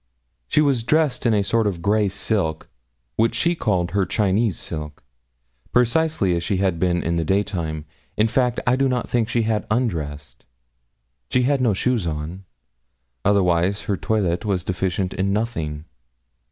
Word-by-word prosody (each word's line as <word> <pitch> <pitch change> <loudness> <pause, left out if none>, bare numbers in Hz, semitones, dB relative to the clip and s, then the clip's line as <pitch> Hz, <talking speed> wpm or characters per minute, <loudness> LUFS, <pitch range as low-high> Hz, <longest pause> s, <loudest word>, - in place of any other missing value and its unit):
She 150 - +3
was 140 -5 +2
dressed 150 +1 +1
in 115 - +3
a 100 - +2
sort 110 +2 +1
of 85 -4 -3
grey 105 +1 +3
silk, 95 -5 -1 0.5
which 115 +1 +2
she 170 +1 +2
called 95 - 0
her 100 -1 +2
Chinese 105 +2 +1
silk 75 -2 -6 0.7
precisely 125 - +2
as 85 - -1
she 100 +2 0
had 95 -3 0
been 85 -1 +1
in 85 +1 0
the 85 - +1
daytime. 85 -5 -1 0.3
In 110 - +4
fact, 125 0 +1
I 125 - +3
do 135 0 +2
not 125 -2 -1
think 115 -2 0
she 115 0 +1
had 110 -1 -1
undressed. 75 - -2 0.9
She 125 - +2
had 135 +1 +2
no 115 -6 +2
shoes 115 -3 0
on. 80 +5 -5 0.8
Otherwise 95 -1 +2
her 100 - -1
toilet 95 -3 0
was 95 -5 -1
deficient 95 0 -1
in 95 +1 0
nothing. 80 -9 -2
100 Hz, 160 wpm, -22 LUFS, 85-115 Hz, 0.9 s, In